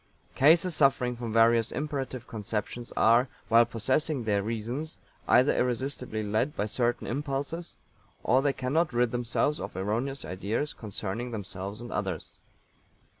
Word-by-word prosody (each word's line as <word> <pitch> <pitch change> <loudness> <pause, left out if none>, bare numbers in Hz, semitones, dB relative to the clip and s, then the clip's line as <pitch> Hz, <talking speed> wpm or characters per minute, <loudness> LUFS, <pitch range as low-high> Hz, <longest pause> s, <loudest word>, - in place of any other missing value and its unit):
"Cases 165 +5 +4
suffering 135 -3 +3
from 120 -1 -5
various 115 0 +4
imperative 135 -5 -3
conceptions 110 +2 -4
are, 120 +3 +5 0.2
while 115 +1 +6
possessing 130 +4 0
their 105 -2 +1
reasons, 115 +9 -3 0.3
either 130 +3 +5
irresistibly 125 -2 -1
led 110 +8 0
by 105 - 0
certain 120 +3 -1
impulses 145 +5 -3 0.5
or 130 +3 +4
they 140 0 +2
cannot 140 +4 0
rid 120 -1 +2
themselves 120 +5 0
of - - -6
erroneous 115 +8 -2
ideas 105 +10 -2
concerning 105 +2 -5
themselves 100 -1 -5
and 120 - -8
others." 95 -5 -3
120 Hz, 130 wpm, -28 LUFS, 110-135 Hz, 0.5 s, while